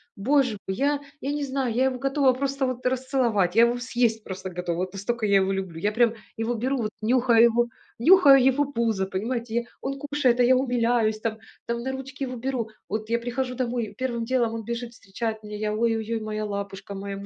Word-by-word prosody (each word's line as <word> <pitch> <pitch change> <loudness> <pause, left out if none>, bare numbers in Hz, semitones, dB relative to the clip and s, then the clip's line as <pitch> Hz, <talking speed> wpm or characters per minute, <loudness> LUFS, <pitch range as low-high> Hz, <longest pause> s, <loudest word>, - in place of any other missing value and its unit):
Боже 255 +1 +2
мой, 190 - -2
я 285 +1 +1 0.2
я 280 - -2
не 290 0 -2
знаю, 265 -3 -1
я 255 +3 +2
его 260 -1 0
готова 275 -1 +3
просто 275 +1 -1
вот 255 -1 -5
расцеловать, 250 -7 +1
я 230 - +7
его 240 +1 0
съесть 240 -3 0
просто 190 -1 -6
готова, 175 -1 -3
вот 185 +1 -3
настолько 220 +3 -2
я 200 -1 +4
его 190 0 +2
люблю. 190 -4 -4
Я 205 +5 +1
прям 230 +1 +3 0.2
его 225 +2 -1
беру 260 +4 -1
вот, 215 - -2
нюхаю 235 0 +4
его, 235 0 +3 0.3
нюхаю 280 -3 +7
его 265 +2 +3
пузо, 230 -7 -1
понимаете 230 +4 -3
я 235 - +1 0.2
Он 275 0 -4
кушает, 285 -4 +1
а 245 - +6
я 255 +1 +5
умиляюсь, 235 -4 +1
там 220 0 -3 0.3
там 235 0 -2
на 265 - -2
ручки 265 +1 -6
его 255 -1 -4
беру. 245 -2 -3 0.2
Вот 215 +1 -3
я 235 - +2
прихожу 250 +1 -3
домой, 245 -2 -1
и 210 - -11
первым 235 -1 -2
делом 240 -2 +1
он 225 - -5
бежит 235 0 -4
встречать 220 +2 -5
меня, 210 0 -7
я: 210 0 -1
"Ой-ой-ой, 225 0 0
моя 215 0 -3
лапушка, 200 -1 -5
моя 200 0 -5
му 200 - -8
235 Hz, 215 wpm, -25 LUFS, 215-260 Hz, 0.3 s, я